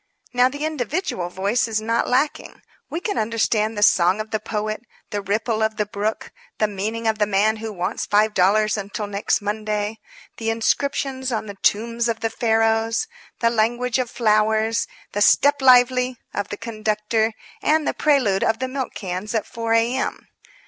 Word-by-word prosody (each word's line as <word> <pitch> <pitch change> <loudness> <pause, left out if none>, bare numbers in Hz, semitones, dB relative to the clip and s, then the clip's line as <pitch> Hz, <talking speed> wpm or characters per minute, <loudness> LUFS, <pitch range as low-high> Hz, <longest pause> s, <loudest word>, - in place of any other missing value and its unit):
Now, 250 +1 +4
the 285 +3 -4
individual 295 - -2
voice 200 +7 0
is 220 -1 0
not 230 +2 0
lacking. 295 +5 -1 0.3
We 330 - -3
can 405 +3 -2
understand 220 -1 0
the 205 - +2
song 185 0 +4
of 215 0 -5
the 215 - 0
poet, 215 0 -3 0.3
the 205 - -2
ripple 215 +3 -1
of 220 0 0
the 210 - +1
brook, 210 +1 -3 0.3
the 215 - +2
meaning 215 +3 -4
of 220 -1 +1
the 210 - +2
man 210 +2 +2
who 220 0 -5
wants 180 -3 -3
$5 210 0 +3
until 205 +1 -4
next 205 +1 -1
Monday, 210 +1 -2 0.4
the 225 -1 -2
inscriptions 265 +3 0
on 220 -2 -2
the 205 - -7
tombs 230 +2 +1
of 230 -1 -2
the 225 - -1
Pharaohs, 225 - +1 0.4
the 230 -1 +3
language 240 +2 +1
of 250 -2 -1
flowers, 220 0 +2 0.2
the 205 - -2
"step 285 +7 +4
lively" 250 -1 +5 0.2
of 205 -1 -2
the 205 - -5
conductor, 220 0 -1 0.3
and 310 0 +2
the - - +1
prelude 260 -11 +2
of 225 - +2
the 260 - -2
milk 260 0 -4
cans 190 +3 -4
at 220 - 0
4 230 -1 -2
A. 230 +2 +3
M. - - -3
220 Hz, 175 wpm, -22 LUFS, 210-240 Hz, 0.4 s, lively